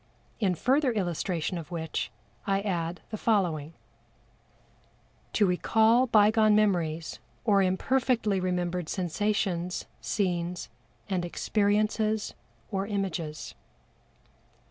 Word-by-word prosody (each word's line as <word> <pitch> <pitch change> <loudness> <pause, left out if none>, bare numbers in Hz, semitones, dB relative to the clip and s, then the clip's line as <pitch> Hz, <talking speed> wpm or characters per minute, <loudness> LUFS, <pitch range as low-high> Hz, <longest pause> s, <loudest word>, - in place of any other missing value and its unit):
In 190 -5 +2
further 265 - +2
illustration 175 -3 -1
of 165 - -9
which 165 -3 -3 0.4
I 195 0 +2
add 175 -4 -2
the 215 - -4
following: 165 -8 0 1.6
To 210 - +4
recall 220 +7 +3
bygone 215 -1 +5
memories 170 -7 +1 0.3
or 200 -3 +4
imperfectly 215 +2 +1
remembered 180 -2 -1
sensations, 185 -1 -1 0.2
scenes 175 -3 -1 0.4
and 185 -3 -1
experiences 215 +3 0 0.4
or 195 -1 -1
images. 185 -7 -3
195 Hz, 90 wpm, -28 LUFS, 175-215 Hz, 1.6 s, bygone